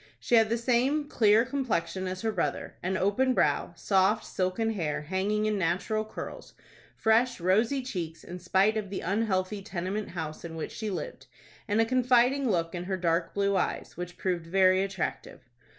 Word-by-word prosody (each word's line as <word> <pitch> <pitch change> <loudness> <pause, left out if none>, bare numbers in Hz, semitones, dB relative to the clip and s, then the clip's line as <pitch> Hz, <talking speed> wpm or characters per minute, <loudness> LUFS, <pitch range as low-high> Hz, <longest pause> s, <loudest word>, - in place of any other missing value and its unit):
She - - -4
had 225 -2 +6
the 230 - +1
same 260 +5 +1
clear 220 -3 +4
complexion 215 -9 -2
as 185 +3 -5
her 220 - +1
brother, 190 -5 -2
an 185 +1 -1
open 250 +8 +2
brow, 145 +3 +1
soft, 195 +4 +2
silken 190 +5 -1
hair 160 -7 -2
hanging 195 +6 0
in 210 -1 0
natural 190 +5 0
curls, 215 - -8 0.4
fresh, 235 +2 +2
rosy 220 +10 +2
cheeks 170 -10 -5
in 180 +1 -8
spite 190 +5 +2
of 205 -3 -3
the 195 - -4
unhealthy 200 0 -1
tenement 190 +3 -4
house 160 -3 -6
in 165 -1 -7
which 160 - -5
she 220 - -4
lived, - - -6 0.4
and 210 +1 +1
a 225 - +5
confiding 255 +2 +3
look 165 -4 0
in 175 0 -4
her 190 0 -2
dark 170 -1 0
blue 200 0 +1
eyes, 185 - -2
which 175 0 -7
proved 175 -3 -2
very 185 +1 +4
attractive. 195 -2 -4
195 Hz, 175 wpm, -28 LUFS, 180-225 Hz, 0.4 s, had